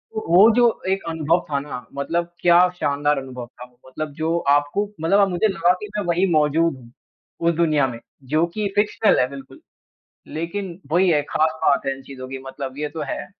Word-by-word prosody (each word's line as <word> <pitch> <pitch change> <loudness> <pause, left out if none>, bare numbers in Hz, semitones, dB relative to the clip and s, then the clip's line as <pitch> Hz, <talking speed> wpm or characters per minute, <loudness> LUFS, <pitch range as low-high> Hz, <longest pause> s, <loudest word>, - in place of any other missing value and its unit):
ओ 220 - -2
वो 185 +6 +7
जो 245 0 +5 0.3
एक 195 0 -1
अनुभव 165 +2 0
था 140 -2 0
ना 125 -4 -7
मतलब 170 +4 -2
क्या 175 0 +6 0.2
शानदार 145 +1 +1
अनुभव 130 -2 -6
था। 125 0 -12 0.2
मतलब 155 +3 -5
जो 160 +3 -1 0.2
आपको 195 +9 -2
मतलब 185 +5 +3
अब 195 -1 +4
मुझे 180 +4 +1
लगा 190 -3 +2
की 210 - -5
मैं 205 - -1
वही 175 +2 +2
मौज़ूद 155 +1 +2
हूँ, 120 -2 -16 0.5
उस 170 0 +2
दुनिया 155 -5 +2
में। 120 -2 -7 0.3
जो 160 +2 +3
की 205 +4 -3
फ़िक्शनल 210 +1 +2
है 125 - +3
बिल्कुल। 135 -1 -11 0.8
लेकिन 175 +2 -4
वही 180 +3 +3
है 150 -3 +3
ख़ास 160 +1 +1
बात 140 0 +2
है 135 - +1
इन 135 - -13
चीज़ 135 -1 -11
की 135 - -5
मतलब 135 0 -7
ये 150 0 -2
तो 160 +1 -6
है। - - -4
160 Hz, 200 wpm, -22 LUFS, 140-175 Hz, 0.8 s, वो